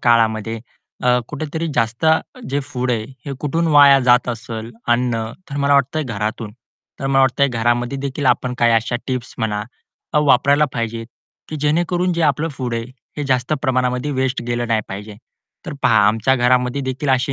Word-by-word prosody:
काळामध्ये 115 Hz, -1 st, +2 dB, 0.4 s
अ, 125 Hz, 0 st, +4 dB
कुठेतरी 155 Hz, +2 st, -4 dB
जास्त 115 Hz, +3 st, -1 dB, 0.5 s
जे 140 Hz, +1 st, 0 dB
फूड 130 Hz, -3 st, -3 dB
आहे 115 Hz, -3 st, -1 dB, 0.2 s
हे 140 Hz, -, -3 dB
कुठून 165 Hz, +3 st, 0 dB
वाया 145 Hz, -3 st, +7 dB
जात 125 Hz, 0 st, +3 dB
असेल 115 Hz, -1 st, -5 dB, 0.2 s
अन्न, 120 Hz, -1 st, +1 dB, 0.3 s
तर 140 Hz, -, -4 dB
मला 140 Hz, 0 st, +2 dB
वाटतंय 140 Hz, +3 st, +2 dB
घरातून. 110 Hz, -3 st, -4 dB, 0.5 s
तर 135 Hz, -, -2 dB
मला 135 Hz, 0 st, +3 dB
वाटतंय 135 Hz, +1 st, +3 dB
घरामध्ये 120 Hz, +2 st, 0 dB
देखील 140 Hz, +1 st, -3 dB
आपण 125 Hz, 0 st, +1 dB
काही 120 Hz, -1 st, +4 dB
अशा 115 Hz, +1 st, +1 dB
टिप्स 130 Hz, -2 st, -4 dB
म्हणा 105 Hz, -3 st, -1 dB, 0.6 s
वापरायला 145 Hz, 0 st, +4 dB
पाहिजे 115 Hz, -1 st, -3 dB, 0.4 s
की 155 Hz, -, -5 dB
जेणेकरून 175 Hz, +4 st, +1 dB
जे 170 Hz, -1 st, -1 dB
आपलं 150 Hz, +1 st, +1 dB
फूड 125 Hz, -3 st, -3 dB
आहे 115 Hz, 0 st, -2 dB, 0.3 s
हे 150 Hz, -, -3 dB
जास्त 130 Hz, +1 st, 0 dB
प्रमाणामध्ये 125 Hz, 0 st, 0 dB
वेस्ट 130 Hz, -2 st, -1 dB
गेलं 120 Hz, -1 st, -2 dB
नाही 115 Hz, -2 st, +2 dB
पाहिजे. 105 Hz, +2 st, -8 dB, 0.5 s
तर -, -, -4 dB
पहा 105 Hz, -2 st, +5 dB
आमच्या 110 Hz, +5 st, +2 dB
घरामध्ये 125 Hz, +1 st, +2 dB
देखील 130 Hz, +2 st, -3 dB
असे 130 Hz, +1 st, +1 dB
125 Hz, 165 wpm, -19 LUFS, 115-140 Hz, 0.6 s, वाया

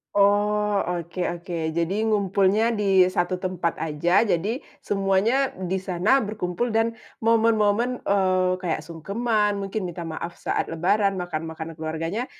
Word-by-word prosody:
Oh, 205 Hz, 0 st, +3 dB
oke 175 Hz, 0 st, -4 dB, 0.2 s
oke. 175 Hz, +1 st, -9 dB, 0.2 s
Jadi 170 Hz, +2 st, 0 dB, 0.2 s
ngumpulnya 200 Hz, +2 st, +2 dB
di 195 Hz, -3 st, +4 dB
satu 175 Hz, +1 st, 0 dB
tempat 180 Hz, -2 st, -2 dB
aja, 165 Hz, +7 st, +2 dB
jadi 205 Hz, +4 st, 0 dB, 0.2 s
semuanya 205 Hz, +7 st, +1 dB, 0.2 s
di 190 Hz, -, +1 dB
sana 190 Hz, +6 st, +2 dB
berkumpul 210 Hz, +2 st, -2 dB
dan 225 Hz, +1 st, +1 dB, 0.2 s
momen-momen, 225 Hz, +1 st, +2 dB
eee, 185 Hz, -2 st, +2 dB
kayak 180 Hz, -3 st, -2 dB
sungkeman, 205 Hz, +4 st, -1 dB
mungkin 195 Hz, 0 st, -3 dB
minta 175 Hz, 0 st, -6 dB
maaf 170 Hz, +2 st, -5 dB
saat -, -, -2 dB
lebaran, 195 Hz, +5 st, +1 dB
makan-makan 165 Hz, -3 st, -5 dB
keluarganya, 165 Hz, +8 st, -3 dB
195 Hz, 125 wpm, -24 LUFS, 175-210 Hz, 0.2 s, di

